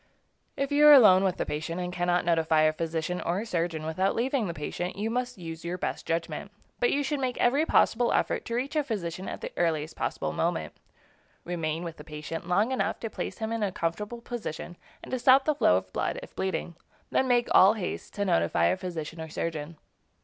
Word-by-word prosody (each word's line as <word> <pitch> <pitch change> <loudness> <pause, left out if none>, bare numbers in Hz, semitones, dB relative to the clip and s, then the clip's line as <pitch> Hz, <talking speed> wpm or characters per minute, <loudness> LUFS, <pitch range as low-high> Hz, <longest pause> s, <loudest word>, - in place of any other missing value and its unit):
If 275 +1 -1
you 295 +1 +6
are 300 - +11
alone 195 -8 +8
with 190 -2 +1
the - - -1
patient, 160 +3 -4
and 180 0 -3
cannot 175 0 +1
notify 165 -2 +3
a 155 0 +4
physician 165 +2 -2
or 185 +6 -1
surgeon 165 -5 -2
without 185 +5 0
leaving 250 -2 0
the 170 - -3
patient, 175 +4 -4
you 215 +3 -2
must 250 0 -2
use 165 -2 -7
your 175 +1 -3
best - - -4
judgment; 165 +2 -2 0.3
but 245 - +3
you 285 - +1
should 290 +1 -1
make 255 -2 -2
every 280 +6 +2
possible 235 +1 +3
effort - - 0
to 235 - -3
reach 265 +6 -2
a 300 - +2
physician 190 -7 -4
at - - -6
the - - -5
earliest 160 -2 0
possible - - -2
moment. - - -1 0.7
Remain 165 -1 -3
with 165 -2 -6
the - - -10
patient 155 +2 -6
long 205 +7 +2
enough 260 - -1
to 225 - -4
place - - -5
him 220 -1 -3
in 230 -1 -2
a 200 -2 0
comfortable 210 +8 -3
position, 220 -8 -6 0.3
and - - -10
to 255 - -1
stop 265 +2 +6
the 305 - +3
flow 90 - +4
of 95 0 -6
blood, - - -1
if - - -13
bleeding; 190 -2 -2 0.4
then 265 - +2
make 240 -1 +3
all 195 +3 +7
haste 190 -5 -5
to 205 0 -1
notify 85 - +2
a 85 - +2
physician 165 -2 -6
or 160 - -6
surgeon. 160 0 -4
180 Hz, 215 wpm, -28 LUFS, 165-235 Hz, 0.7 s, are